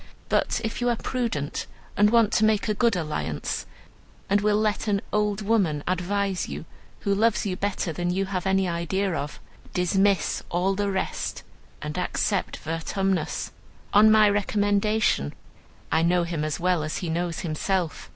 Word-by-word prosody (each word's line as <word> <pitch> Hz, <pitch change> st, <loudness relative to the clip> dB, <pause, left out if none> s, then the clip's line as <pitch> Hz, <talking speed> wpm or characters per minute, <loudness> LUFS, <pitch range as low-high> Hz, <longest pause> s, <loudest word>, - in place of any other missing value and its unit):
But -, -, +1 dB
if 225 Hz, +2 st, -3 dB
you 245 Hz, -, +2 dB
are 240 Hz, -, +2 dB
prudent 225 Hz, -, -2 dB, 0.3 s
and 210 Hz, +1 st, +5 dB
want 230 Hz, -1 st, +4 dB
to 220 Hz, -, +3 dB
make 215 Hz, -1 st, +3 dB
a 215 Hz, -, +2 dB
good 230 Hz, 0 st, +2 dB
alliance, 150 Hz, -, -3 dB, 0.6 s
and 200 Hz, 0 st, +4 dB
will 210 Hz, 0 st, +3 dB
let 215 Hz, 0 st, 0 dB
an 200 Hz, -1 st, +1 dB
old 210 Hz, 0 st, +1 dB
woman 190 Hz, -9 st, +1 dB
advise 185 Hz, +1 st, -1 dB
you, -, -, -6 dB, 0.4 s
who 200 Hz, -, +1 dB
loves 225 Hz, +3 st, +2 dB
you 190 Hz, -2 st, -1 dB
better 190 Hz, -3 st, -2 dB
than 175 Hz, +2 st, -2 dB
you 190 Hz, +2 st, 0 dB
have 190 Hz, -1 st, -3 dB
any 190 Hz, 0 st, +2 dB
idea 175 Hz, +3 st, -1 dB
of, 150 Hz, -2 st, -4 dB, 0.4 s
dismiss 190 Hz, +2 st, +2 dB
all 180 Hz, +3 st, +1 dB
the 200 Hz, +1 st, -1 dB
rest 190 Hz, -1 st, -3 dB, 0.4 s
and 150 Hz, +3 st, -3 dB
accept 190 Hz, +2 st, -1 dB
Vertumnus, 180 Hz, +4 st, -2 dB, 0.4 s
on 210 Hz, +2 st, +7 dB
my 215 Hz, -1 st, +6 dB
recommendation. 205 Hz, -, +1 dB, 0.6 s
I 160 Hz, -, +3 dB
know 175 Hz, +1 st, +3 dB
him 170 Hz, -3 st, -2 dB
as 155 Hz, -1 st, -2 dB
well 180 Hz, -1 st, +2 dB
as 155 Hz, 0 st, -3 dB
he 180 Hz, -, -4 dB
knows 170 Hz, 0 st, -2 dB
himself. 175 Hz, +1 st, -2 dB
195 Hz, 160 wpm, -25 LUFS, 170-210 Hz, 0.6 s, on